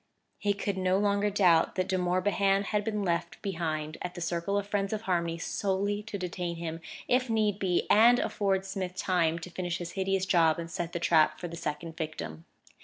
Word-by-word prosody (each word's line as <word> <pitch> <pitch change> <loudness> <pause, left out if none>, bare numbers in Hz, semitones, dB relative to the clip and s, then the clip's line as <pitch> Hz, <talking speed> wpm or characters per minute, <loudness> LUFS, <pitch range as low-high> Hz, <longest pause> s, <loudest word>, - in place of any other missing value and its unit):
He 205 -1 +1
could 200 -1 -3
no 185 0 +2
longer 205 0 +2
doubt 180 -5 +3
that 185 0 0
De 190 - 0
Morbihan 195 +2 +2
had 210 0 -1
been 210 -1 -2
left 170 -1 -1
behind 155 -5 -3
at 180 0 -5
the - - -6
Circle 175 +3 -1
of 205 - -1
Friends 200 0 -1
of 215 - -2
Harmony 170 -4 0
solely 200 +3 -1
to 210 -1 -6
detain 180 -2 -3
him, 165 -1 -5 0.3
if 250 0 +2
need 215 -3 +1
be, 180 -2 +1
and 235 +3 +6
afford 195 -4 0
Smith 190 -2 -4
time 175 -3 +1
to 170 +1 -8
finish 175 -1 -3
his 170 -1 -6
hideous 190 0 0
job 165 -4 +4
and 165 0 -6
set 170 +1 -4
the 170 - -2
trap 155 -2 +3
for 175 - -4
the 170 - -7
second 165 0 -5
victim. 150 - -5
185 Hz, 200 wpm, -29 LUFS, 170-200 Hz, 0.3 s, and